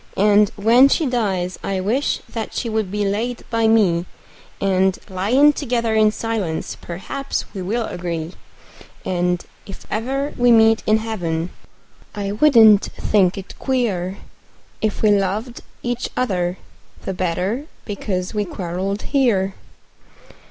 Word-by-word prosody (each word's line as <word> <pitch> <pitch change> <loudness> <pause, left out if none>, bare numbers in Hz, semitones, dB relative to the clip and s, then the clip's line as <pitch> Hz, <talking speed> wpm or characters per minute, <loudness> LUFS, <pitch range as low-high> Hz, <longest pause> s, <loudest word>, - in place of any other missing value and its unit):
And 205 0 +5
when 235 +6 +5
she 315 - +2
dies 195 -8 -1
I 195 -1 -1
wish 230 +10 0
that 225 -2 -6
she 235 - -2
would 220 -3 -1
be 205 +1 -1
laid 230 +5 -2
by 230 -1 +2
me, 185 -6 +3 0.5
And, 190 -1 +2
lyin' 245 +11 +4
together 235 -5 -1
in 215 -1 +4
silence, 210 -8 -3
perhaps 195 +11 -5
we 195 - -5
will 220 +6 -1
agree; 170 -2 -4 0.7
And, 180 -1 0 0.2
if 195 - -10
ever 270 +6 -2
we 245 0 +4
meet 225 -1 +5
in 215 +1 +5
heaven, 175 -7 -3 0.6
I 200 -1 -3
wouldn't 220 -4 +6
think 195 -2 +1
it 195 - -8
queer 200 -8 -1 0.6
If 215 0 -1
we 215 - +5
loved 205 +5 -1 0.2
each 245 0 -2
other 185 -7 0 0.5
the 190 - -3
better 185 - -2 0.2
because 195 -3 -3
we 210 -1 0
quarreled 190 +2 -4
here. 220 -9 +1
210 Hz, 130 wpm, -20 LUFS, 185-230 Hz, 0.7 s, wouldn't